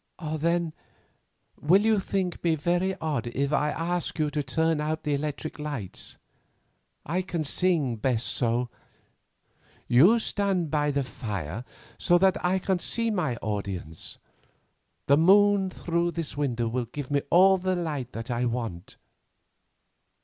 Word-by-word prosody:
"Then, 170 +1 0 0.9
will 185 +7 +5
you 220 -1 +3
think 190 -2 -2
me 165 -2 +3
very 175 +5 0
odd 150 -7 -2
if 140 +4 -1
I 150 0 +2
ask 170 +3 -2
you 155 -2 0
to 150 0 -1
turn 160 +3 0
out 155 +1 -2
the 150 - 0
electric 150 +2 -3
lamps? 145 -11 -5 0.9
I 175 +5 0
can 175 -3 -3
sing 150 -6 +1
best 120 0 0
so. 120 0 0 1.2
You 170 - +6
stand 195 -7 -1
by 150 -1 +1
the 140 -1 0
fire, 105 - -5 0.4
so 175 - +4
that 190 +1 +2
I 180 +2 +2
can 190 -1 0
see 230 +5 -1
my 165 - 0
audience; 100 -6 -4 0.9
the 140 - +5
moon 195 +3 +5
through 170 -1 -1
this 165 -4 -4
window 125 -5 -1
will 120 +2 -1
give 145 +2 -7
me 140 -1 +2
all 190 +2 +6
the 185 0 0
light 135 -8 -4
I 120 +1 0
want." 115 -7 -4
150 Hz, 140 wpm, -27 LUFS, 125-180 Hz, 1.2 s, You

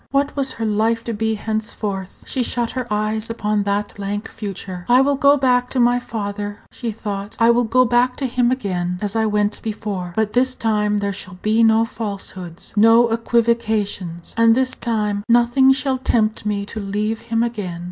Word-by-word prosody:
What 280 +1 0
was 270 -2 0
her 225 - -3
life 220 +2 +1
to 230 - -3
be 220 +1 -1
henceforth? 210 -3 -4
She 260 - -2
shut 240 -1 -1
her 255 -2 -4
eyes 215 +1 -1
upon 210 -2 0
that 205 +1 -1
blank 205 +1 -4
future. 195 -3 -6
"I 245 +1 +6
will 285 +1 +3
go 280 +1 +5
back 250 -2 +2
to 260 - -1
my 245 0 +4
father," 205 -3 -5
she 235 -2 -4
thought; 205 -1 -5
"I 230 0 +5
will 240 +1 +2
go 255 +3 +3
back 245 +1 +2
to 275 - -3
him 245 -1 +1
again, 180 -8 -2
as 205 +2 -3
I 220 -1 +2
went 210 0 0
before. 205 -5 -4
But 220 -1 0
this 255 +1 +2
time 210 -2 +1
there 200 -1 -1
shall 185 -1 -8
be 220 +2 +3
no 225 0 +5
falsehoods, 195 -6 -6
no 225 +2 +6
equivocations, 220 -6 0
and 230 0 +5
this 260 0 +1
time 210 -3 -2
nothing 240 +3 +5
shall 265 0 0
tempt 220 -4 0
me 200 -1 -1
to 215 +2 -6
leave 210 +2 -2
him 230 0 +2
again." 205 -8 -4
220 Hz, 190 wpm, -20 LUFS, 205-240 Hz, -, I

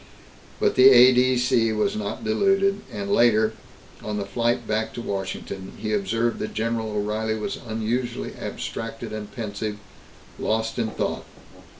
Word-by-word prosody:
But - - +2
the 130 +1 +8
A.D.C. 125 -2 +5
was 105 0 0
not 105 -1 -4
deluded 195 - +2
and 200 0 -3
later, 110 - +4 0.5
on 105 -1 -4
the 100 - -2
flight 120 +4 0
back 110 +1 -1
to 120 - -4
Washington, 95 -1 -5
he 110 -1 -3
observed 115 +4 0
that 110 - -5
General 115 0 -1
O'Reilly 105 +1 -1
was 105 - -4
unusually 115 +2 -2
abstracted - - -5
and 105 -1 -6
pensive, 105 -1 -4 0.6
lost 110 +1 -1
in 115 - +1
thought. - - -3
110 Hz, 135 wpm, -24 LUFS, 105-120 Hz, 0.6 s, the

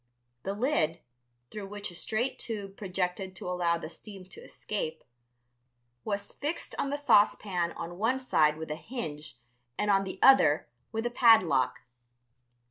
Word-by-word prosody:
The 195 +7 -3
lid, 205 - +1 0.5
through 210 -2 -6
which 205 -1 -5
a - - -12
straight 220 +8 -2
tube 200 -4 -5
projected 185 -1 -3
to - - -7
allow 175 -2 +1
the 165 - -7
steam 195 +2 -11
to - - -11
escape, 160 -7 -5 1.0
was 200 -1 -3
fixed 300 +4 -3
on 275 - 0
the 285 - -1
saucepan 205 -9 +3
on 175 +2 -7
one 240 +5 +1
side 155 -12 +2
with 160 -1 -6
a - - -1
hinge 155 - -6 0.4
and 210 0 +1
on 195 0 +4
the 190 -1 -6
other 265 - +6 0.2
with 225 +1 -3
a 240 - 0
padlock. 185 - +4
195 Hz, 150 wpm, -29 LUFS, 170-220 Hz, 1.0 s, other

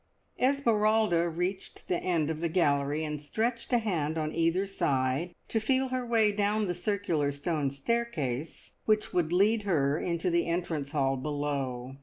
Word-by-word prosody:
Esmeralda 220 -9 +3
reached 180 +4 -4
the 175 - 0
end 165 -4 0
of 155 - -4
the 170 0 -1
gallery, 145 -3 +1
and 150 -1 -4
stretched 230 - -2
a 245 - +5
hand 165 -9 -1
on 155 -1 -2
either 165 +4 +1
side, 140 -2 -1
to 225 - 0
feel 260 +4 +1
her 255 0 -1
way 225 -3 +3
down 210 +1 +1
the 180 - -1
circular 175 -6 0
stone 145 0 -1
staircase 150 - -3
which 215 -1 +1
would 170 -3 +1
lead 210 +5 +3
her 155 -7 +1
into 170 +1 -1
the 170 0 +1
entrance 170 -4 -2
hall 135 -3 +1
below. 135 -3 -3
170 Hz, 160 wpm, -29 LUFS, 145-210 Hz, -, a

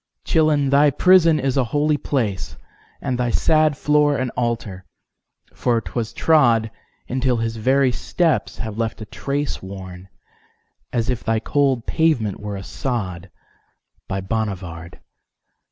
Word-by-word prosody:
Chillon! 150 -4 +2
thy 145 +1 +5
prison 165 +1 +5
is 135 0 -1
a 135 - +4
holy 145 +6 +1
placeAnd 110 - -4
thy 125 -1 0
sad 155 +3 +2
floor 150 -1 +2
an 130 -2 -2
altar, 115 -6 -3 0.7
for 120 -2 +1
'twas 115 0 -4
trod, 120 -9 +3 0.4
Until 130 -1 0
his 115 0 -2
very 130 +3 +3
steps 165 +4 0
have 110 -1 -5
left 115 -1 -2
a - - -5
traceWorn 95 -10 -5 0.8
as 115 +1 0
if 125 - -4
thy 115 0 +1
cold 135 -1 +1
pavement 150 - +1
were 105 -1 -5
a 95 - -6
sod, 100 -7 -4 0.8
By 95 0 -3
Bonnivard! 95 -5 -4
120 Hz, 125 wpm, -21 LUFS, 105-145 Hz, 0.8 s, thy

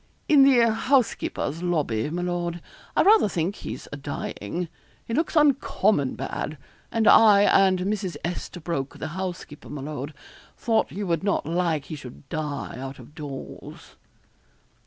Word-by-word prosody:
'In 300 -5 +6
the 245 -4 +6
housekeeper's 225 - 0
lobby, 150 -10 0
my 175 +3 -3
lord. 175 -1 -2 0.4
I - - +5
rather 420 - +6
think 175 +2 -2
he's - - -7
a 145 - -5
dying. 145 - -4 0.4
He 230 - -5
looks 320 +6 0
uncommon 215 - +3
bad, 150 +1 -4 0.3
and 225 -1 +1
I 210 -3 +8
and 190 -2 +4
Mrs. 195 -1 -2
Esterbroke, 170 -5 -4
the 155 - -5
housekeeper, 175 -3 -6
my 150 - -6
lord, 145 0 -5 0.4
thought 225 -2 +1
you 205 +2 -4
would 170 -1 0
not 200 - 0
like 165 -3 0
he 155 - -6
should 135 -1 -11
die 150 -5 -4
out 135 +1 -6
of 125 +3 -14
doors.' 145 -4 -9
175 Hz, 145 wpm, -25 LUFS, 150-210 Hz, 0.4 s, I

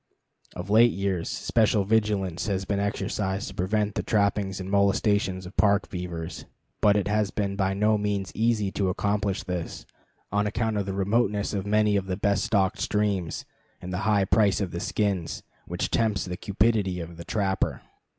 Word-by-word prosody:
Of 90 +3 -5
late 115 +3 +7
years, 95 -3 -1
special 110 -2 +2
vigilance 100 -4 0
has 95 -2 -1
been 100 +1 -1
exercised 100 0 -2
to - - -10
prevent 105 +3 0
the - - -1
trapping 100 -2 +1
and 95 - -5
molestation 100 -1 +2
of 95 - -9
the 90 - -9
Park 100 +1 +2
beaver, 85 -3 -4 0.5
but 105 -1 +5
it 100 - 0
has 105 -1 +1
been 100 -2 -2
by 95 -1 0
no 105 +1 +2
means 100 -2 -2
easy 110 -3 +1
to 95 -2 0
accomplish 100 +1 -1
this, 90 -3 -5 0.5
on 105 +1 +1
account 110 0 -1
of 100 -1 -2
the 95 - -2
remoteness 100 +1 +1
of 100 -1 -2
many 105 0 +3
of 95 -1 -2
the 90 -1 -2
best 100 -1 +1
stocked 100 +1 +1
streams, 100 -6 -1 0.3
and 90 +1 -7
the 90 - -1
high 100 -2 +3
price 100 +1 +3
of 95 -4 -2
the 85 - -4
skins, 100 -3 -1 0.2
which - - -3
tempts 110 -4 +1
the 90 -1 -4
cupidity 100 -1 +1
of 85 0 -7
the 85 - -7
trapper. 95 -2 -1
100 Hz, 180 wpm, -26 LUFS, 95-105 Hz, 0.5 s, late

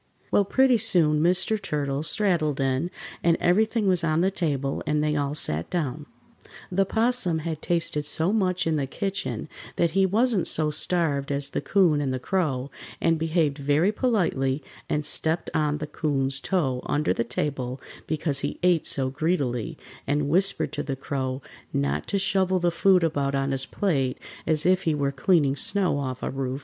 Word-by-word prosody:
Well, 200 - +4
pretty 260 +2 +3
soon 160 -8 +3
Mr. 185 +5 +2
Turtle 145 -6 -2
straddled 160 -4 0
in, 135 +5 0 0.3
and 170 -1 +3
everything 215 +4 +2
was 180 -2 +2
on 160 0 +2
the 190 +2 +2
table 140 -7 -1
and 150 0 +1
they 150 0 +1
all 145 0 -1
sat 80 - 0
down. 150 -3 -3 0.6
The 195 +2 +2
'Possum 225 -7 +1
had 160 -2 -4
tasted 170 -3 0
so 160 +6 +1
much 185 -4 +1
in 160 -1 +1
the 140 -2 -1
kitchen 195 +1 -3 0.3
that 170 -1 +1
he 190 +2 +3
wasn't 220 -1 +2
so 155 -1 +2
starved 150 -3 0
as 140 0 -1
the - - -2
'Coon 175 -7 +3
and 135 -2 -1
the 130 - -1
Crow, 140 -4 -1 0.3
and 165 -1 +2
behaved 160 -3 0
very 145 +7 +2
politely, 165 - 0 0.3
and 150 0 -1
stepped 160 +3 0
on 150 -2 +1
the 150 - -4
'Coon's 135 -3 -1
toe 135 -8 -1
under 150 +1 +1
the - - -1
table 125 +1 -3 0.3
because 150 -2 -1
he - - -3
ate 175 -3 +3
so 130 -2 0
greedily, 135 -6 -1 0.3
and 145 0 0
whispered 190 +5 +1
to 145 - -2
the 140 -2 -3
Crow 130 0 -3 0.3
not 70 +1 -1
to 200 - 0
shovel 190 -1 +1
the 175 -1 +1
food 180 +1 +4
about 140 -4 0
on 135 0 0
his 135 -1 +1
plate, 140 -10 0 0.3
as 155 -1 +1
if 185 +1 +4
he 160 -2 +2
were 140 -1 0
cleaning 140 0 +2
snow 185 -1 0
off 130 -2 -4
a - - -2
roof. 135 0 -3
155 Hz, 180 wpm, -25 LUFS, 140-180 Hz, 0.6 s, Well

